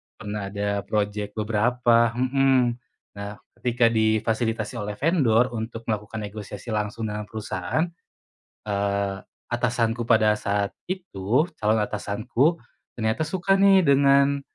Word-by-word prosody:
pernah 105 -1 -5
ada 100 0 -1
project 105 -1 -1
beberapa 115 +2 +3
mhm, 130 -1 +2 0.4
nah 100 +1 -7 0.2
ketika 120 -1 +2
difasilitasi 110 +1 0
oleh 105 -1 -3
vendor 130 -8 +3
untuk 115 +1 -5
melakukan 110 0 -3
negosiasi 105 0 -7
langsung 105 +1 -2
dengan 105 0 -5
perusahaan, 110 - -2 0.9
eee, 100 -1 0 0.3
atasanku 120 -1 0
pada 110 -1 +4
saat 100 -1 -1 0.2
itu, 155 - -1
calon 110 +1 +2
atasanku 125 +10 0 0.4
ternyata 110 +3 0
suka 180 +4 +1
nih 195 -3 +6
dengan 140 0 +4
110 Hz, 110 wpm, -24 LUFS, 105-125 Hz, 0.9 s, nih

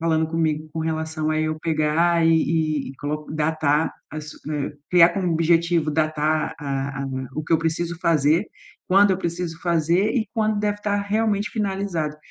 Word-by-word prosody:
falando 160 -1 +1
comigo 160 -1 -1
com 160 - -3
relação 160 -1 -2
a 155 0 +1
eu 155 0 -1
pegar 165 +2 +2
e - - +5 0.6
e - - -6
e - - -12
coloco 150 +2 -5
datar 155 -1 +1 0.2
as 155 0 -7 0.2
eh, 150 -1 -2 0.2
criar 175 -1 +7
como 180 -1 -1
objetivo, 165 -1 +2
datar 155 0 0
a 135 -1 -3
a - - -3 0.3
o 155 - -3
que 155 - -2
eu 165 - +5
preciso 165 +1 -2
fazer, 160 +3 +2 0.4
quando 200 +2 +5
eu 185 - +1
preciso 170 -2 -4
fazer 170 +4 +2
e 225 -5 -1
quando 215 -2 +1
deve 205 0 -1
tá 205 -1 0
realmente 205 +1 0
finalizado, 190 -7 -2
165 Hz, 170 wpm, -23 LUFS, 155-180 Hz, 0.6 s, criar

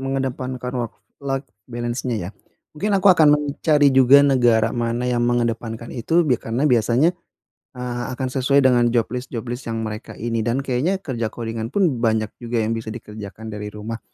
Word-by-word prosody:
mengedepankan 130 -2 -3
work-life 135 +4 -5 0.2
balance-nya 120 +1 -3
ya, - - -5 0.4
mungkin 200 +7 0
aku 190 0 +6
akan 160 -3 +5
mencari 145 0 +2
juga 135 +2 +7
negara 120 -5 +3
mana 120 0 -1
yang 125 -1 0
mengedepankan 115 -1 -2
itu 165 +8 +1
bi 125 -6 +1
karena 120 +5 -2
biasanya, 125 +5 +3 0.6
eee, 125 -1 -4
akan 130 +1 -3
sesuai 135 +1 +3
dengan 120 -2 +4
job 120 -1 +2
list 125 0 -4
job 115 -2 -5
list 120 0 -6
yang 115 0 -2
mereka 110 0 -7
ini, 115 0 -2
dan 120 +5 -1
kayaknya 135 +9 0
kerja 125 - -3
coding-an 115 0 -5
pun 180 +2 +2
banyak 110 -2 +1
juga 120 0 -4
yang 110 - -1
bisa 115 -1 -4
dikerjakan 110 -1 -8
dari 105 0 -5
rumah. 105 +2 -6
120 Hz, 170 wpm, -21 LUFS, 115-135 Hz, 0.6 s, juga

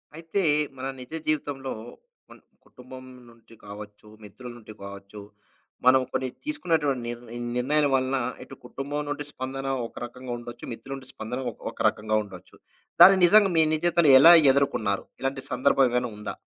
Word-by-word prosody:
అయితే, 165 +4 -3 0.4
మన 130 - -6
నిజ 125 +2 -11 0.2
జీవితంలో 140 -3 -2 0.6
కొన్ని - - -17 0.2
కుటుంబం 130 +1 -13 0.3
నుంచి 115 0 -20
కావచ్చు, 105 +1 -11 0.2
మిత్రుల 120 +4 -11
నుంటి 110 -2 -13
కావచ్చు, 100 +1 -10 0.6
మనం 130 +1 +6
కొన్ని 130 - -1 0.2
తీసుకున్నటువంటి 165 - -1
నిర్ 120 0 -6 0.4
నిర్ణయాల 145 +4 +1
వలన 130 0 +1 0.3
ఇటు - - -12
కుటుంబం 145 +2 -5
నుండి 145 0 -4
స్పందన 135 +1 -6 0.2
ఒక - - -25
రకంగా 125 +1 -9
ఉండొచ్చు, 120 0 -11
మిత్రుల 135 +4 -9
నుండి 130 -1 -10
స్పందన 115 +4 -6
ఒక్ - - -22
ఒక - - -24
రకంగా 110 0 -2
ఉండొచ్చు. 95 -4 -14 0.5
దాన్ని 190 +2 +9
నిజంగా 200 +1 +5
మీ 160 - +6
నిజ 155 - -1
జీవితంలో 170 -4 +4
ఎలా 165 +5 +9 0.2
ఎదుర్కొన్నారు? 120 -8 0 0.2
ఇలాంటి 135 0 -2
సందర్భం 135 +1 +3
ఏమైనా 125 0 -1
ఉందా? 105 0 -6
130 Hz, 155 wpm, -25 LUFS, 115-145 Hz, 0.6 s, దాన్ని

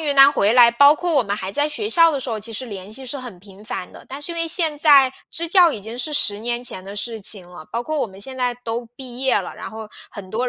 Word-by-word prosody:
云 290 -3 -1
南 275 +1 +8
回 210 -2 +2
来， 240 -2 +7
包 285 +5 +6
括 350 +1 -3
我 275 -4 +3
们 200 -1 -3
还 190 -1 -5
在 290 +7 +1
学 415 +8 -3
校 330 -4 +5
的 285 - -2
时 255 -2 -5
候， 220 - -3
其 225 +3 -8
实 225 +3 -5
联 200 -4 -8
系 260 +5 -5
是 265 +2 -5
很 245 -8 -9
频 195 +2 -16
繁 195 -5 -6
的。 - - -13
但 275 +2 -8
是 340 - -3
因 - - -7
为 330 0 -1
现 320 -3 +1
在 280 -4 +6 0.2
支 335 +1 -1
教 350 -1 +5
已 210 -7 -6
经 225 +3 -8
是 280 +5 -2
10 205 -8 +2
年 240 +2 -3
前 225 -6 -6
的 200 +2 -9
事 225 +1 -4
情 195 -2 +1
了， 175 -3 -12
包 235 +1 -3
括 310 +3 -3
我 - - 0
们 190 -1 -14
现 260 +6 -6
在 250 -1 -1
都 235 +1 -4
毕 255 -2 -8
业 265 -4 +2
了， 190 - -6
然 - - -8
后 220 0 -8 0.2
很 190 -2 -10
多 245 +3 -1
245 Hz, 315 characters per minute, -21 LUFS, 210-285 Hz, 0.2 s, 南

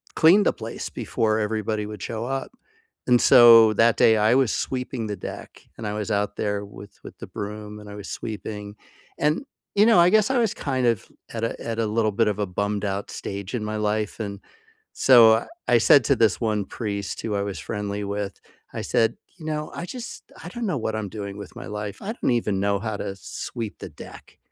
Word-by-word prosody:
clean 175 +6 +6
the - - +2
place 115 0 -6
before 110 +1 -1
everybody 105 0 -2
would 105 -2 -8
show 115 0 -4
up. 135 +1 -3 0.6
And 125 -1 +5
so 115 -4 +8
that 115 +2 +4
day, 110 -1 +5
I 110 +3 +4
was 130 -5 +3
sweeping 125 -3 -3
the 105 - -3
deck, 90 - -9
and 110 - -5
I 105 - -3
was 105 +1 -3
out 105 0 0
there 105 -1 -2
with 100 0 -12
with - - -11
the - - -8
broom, 105 +1 -7
and 105 0 -11
I 105 - -8
was 105 - -8
sweeping. 105 -1 -6 0.4
And, 155 - 0 0.3
you 210 +2 +5
know, 225 - +6
I 175 +2 +6
guess 215 -1 +4
I 265 - +1
was 230 -4 +2
kind 130 -3 -1
of 115 -4 +1 0.3
at 115 - -4
a 115 - -2
at 115 -1 -4
a 115 - +1
little 110 0 +1
bit 115 +2 +2
of 105 -1 0
a 105 - 0
bummed-out 100 +1 -2
stage 100 +3 -5
in 110 -3 -3
my 110 0 -3
life, 105 0 -1
and 100 -2 -5 0.5
so 115 -3 +6 0.2
I 120 - +5
said 140 +3 +6
to - - +3
this 110 -4 +2
one 105 -3 0
priest 100 -2 -4
who 110 - -3
I 100 - 0
was 100 -3 -4
friendly 105 +2 -4
with, 100 0 -4 0.3
I - - -4
said, 115 0 +1 0.2
"You 155 - -10
know, 150 -1 -3
I 175 - -5
just 240 +3 -8
I 175 - -7
don't 235 +3 -4
know 180 - 0
what 110 -2 -2
I'm 105 -3 -3
doing 100 -1 -6
with 100 -3 -10
my - - -8
life. 105 -1 -5
I 210 +3 -3
don't 235 - -1
even 105 -5 0
know 100 0 +1
how 110 +1 -4
to 95 - -4
sweep 110 +3 -6
the - - -7
deck." - - -13
110 Hz, 220 wpm, -24 LUFS, 105-120 Hz, 0.6 s, so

